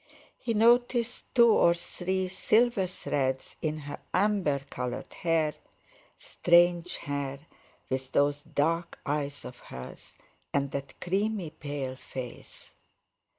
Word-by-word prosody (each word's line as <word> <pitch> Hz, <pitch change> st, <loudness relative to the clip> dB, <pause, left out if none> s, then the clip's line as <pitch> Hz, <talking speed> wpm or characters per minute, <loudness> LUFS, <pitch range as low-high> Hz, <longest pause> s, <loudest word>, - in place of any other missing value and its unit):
He 230 Hz, -2 st, -1 dB
noticed 240 Hz, +2 st, +3 dB
two 235 Hz, -2 st, +7 dB
or 170 Hz, -5 st, +5 dB
three 185 Hz, +2 st, -2 dB
silver 210 Hz, +2 st, +2 dB
threads 130 Hz, -7 st, -2 dB
in 155 Hz, -1 st, -1 dB
her 145 Hz, 0 st, -6 dB, 0.2 s
amber 190 Hz, -7 st, +2 dB
coloured 125 Hz, -2 st, -5 dB
hair, 160 Hz, -3 st, +1 dB, 0.6 s
strange 175 Hz, 0 st, +3 dB
hair 140 Hz, -1 st, -4 dB, 0.5 s
with 130 Hz, 0 st, -3 dB
those 145 Hz, 0 st, +2 dB
dark 160 Hz, +3 st, -1 dB
eyes 145 Hz, -1 st, -2 dB
of 125 Hz, -, -9 dB
hers, 65 Hz, 0 st, -10 dB, 0.4 s
and 140 Hz, -1 st, +1 dB
that 140 Hz, -1 st, -6 dB
creamy 195 Hz, -2 st, -1 dB
pale 145 Hz, -4 st, -4 dB
face. 130 Hz, -2 st, -9 dB
160 Hz, 110 wpm, -29 LUFS, 140-190 Hz, 0.6 s, two